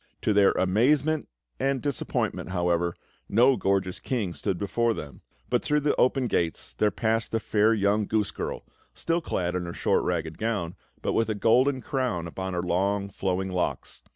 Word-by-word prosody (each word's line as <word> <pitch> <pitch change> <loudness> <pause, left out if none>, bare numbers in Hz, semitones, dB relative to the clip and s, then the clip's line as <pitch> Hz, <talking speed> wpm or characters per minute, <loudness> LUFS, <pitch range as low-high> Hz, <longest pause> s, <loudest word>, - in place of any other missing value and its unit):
To 105 - +2
their 100 -1 +6
amazement 140 +11 +2 0.3
and 135 -1 +1
disappointment, 140 -8 -2
however, 85 -1 0 0.3
no 125 +5 +5
gorgeous 95 -3 0
king 110 -9 -2
stood 90 - -2
before 115 +4 0
them; 70 -2 -8 0.3
but - - +1
through 150 0 +1
the 145 0 +1
open 130 +1 +3
gates 85 -8 -1
there 105 - +4
passed 110 +2 0
the 115 - 0
fair 110 0 +2
young 105 -1 +2
goose 105 -2 0
girl, - - -5 0.3
still 170 +1 0
clad 90 - -2
in 90 -1 -2
her 85 - -5
short - - +1
ragged 80 0 -2
gown, 105 -7 -1 0.3
but - - 0
with 115 -1 +1
a 110 - 0
golden 130 +6 +3
crown 120 -11 -2
upon 95 +3 -5
her 85 - -1
long, 100 +3 0
flowing 95 -1 -2
locks. 90 -1 -3
105 Hz, 175 wpm, -27 LUFS, 90-120 Hz, 0.3 s, their